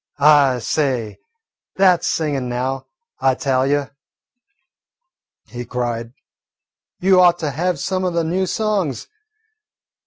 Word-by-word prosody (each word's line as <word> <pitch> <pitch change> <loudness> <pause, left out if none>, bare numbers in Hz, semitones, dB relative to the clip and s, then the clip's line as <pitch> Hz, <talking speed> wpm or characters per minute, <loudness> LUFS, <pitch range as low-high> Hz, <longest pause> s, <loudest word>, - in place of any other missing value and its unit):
"I 145 -3 +5
say, 125 -3 -2 0.6
that 185 -3 +4
's - - -1
singin' 140 -6 -1
now, 130 +2 -3 0.3
I 130 -1 +2
tell 130 -1 0
you," 145 0 0 1.5
he 120 +2 -7
cried. 120 -1 -4 0.9
"You 185 0 +4
ought 175 -1 +5
to 155 -4 -3
have 175 +5 -1
some 185 -1 -2
o' - - +1
the 170 -1 -1
new 185 +4 -1
songs. 195 - -1
145 Hz, 120 wpm, -19 LUFS, 125-175 Hz, 1.5 s, I